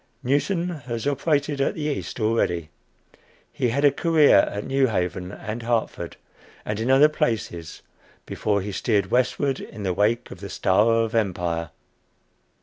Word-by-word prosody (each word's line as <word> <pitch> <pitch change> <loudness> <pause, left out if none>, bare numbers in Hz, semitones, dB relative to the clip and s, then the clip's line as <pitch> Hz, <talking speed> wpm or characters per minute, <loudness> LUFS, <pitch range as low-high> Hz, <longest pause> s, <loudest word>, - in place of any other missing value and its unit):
Newton 170 +7 0
has 125 -8 -5
operated 145 0 0
at - - 0
the 155 - -4
East 150 -4 -3
already. 90 -8 0 0.8
He 125 - 0
had 140 +5 +1
a 145 - +6
career 155 0 +4
at 100 +1 -5
New 135 0 +2
Haven 90 -3 -2
and 110 +3 -6
Hartford, 115 -1 -2 0.5
and 105 0 -3
in 115 +3 -1
other 135 +3 +7
places, 105 - -3 0.4
before 100 -2 -1
he 100 +2 -5
steered 100 -1 0
westward 130 +2 +1
in 105 - -8
the 95 -2 0
wake 110 +6 0
of - - -9
the 100 - -7
"Star 95 +3 +2
of 115 -1 +1
Empire." 85 -7 -1
115 Hz, 150 wpm, -24 LUFS, 100-140 Hz, 0.8 s, other